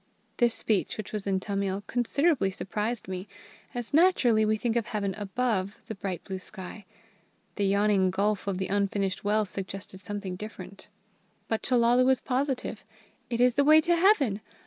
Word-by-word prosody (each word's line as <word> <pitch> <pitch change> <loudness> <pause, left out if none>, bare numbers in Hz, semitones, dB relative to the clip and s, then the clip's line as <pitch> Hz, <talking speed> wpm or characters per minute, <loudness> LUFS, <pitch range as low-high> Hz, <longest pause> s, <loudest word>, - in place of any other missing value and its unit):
This 240 -2 +3
speech, 210 -4 0
which 215 -1 -7
was 210 -2 -3
in 190 -1 +1
Tamil, 195 0 -2
considerably 250 - +2
surprised 210 +3 -3
me, 185 +1 -5 0.5
as 240 +2 -5
naturally 285 -10 +4
we 215 0 +2
think 230 +1 -1
of 235 -1 0
Heaven 200 -3 -2
above 205 -1 -2
the - - -5
bright 195 -3 -5
blue 190 -1 -5
sky. 190 +1 -8 0.7
The 200 -1 +1
yawning 200 -1 +3
gulf 200 +2 0
of 195 -2 -1
the 190 - -2
unfinished 200 -1 -1
well 210 +1 +2
suggested 195 0 -7
something 200 -2 -5
different. 215 +4 -9 0.6
But 225 - -1
Chellalu 245 0 +3
was 265 -1 +4
positive. 260 -4 -2 0.5
"It 235 -1 -2
is 250 0 +5
the 280 - +3
way 310 +2 +7
to 345 +2 +2
Heaven. 300 - +3
210 Hz, 165 wpm, -28 LUFS, 195-245 Hz, 0.7 s, way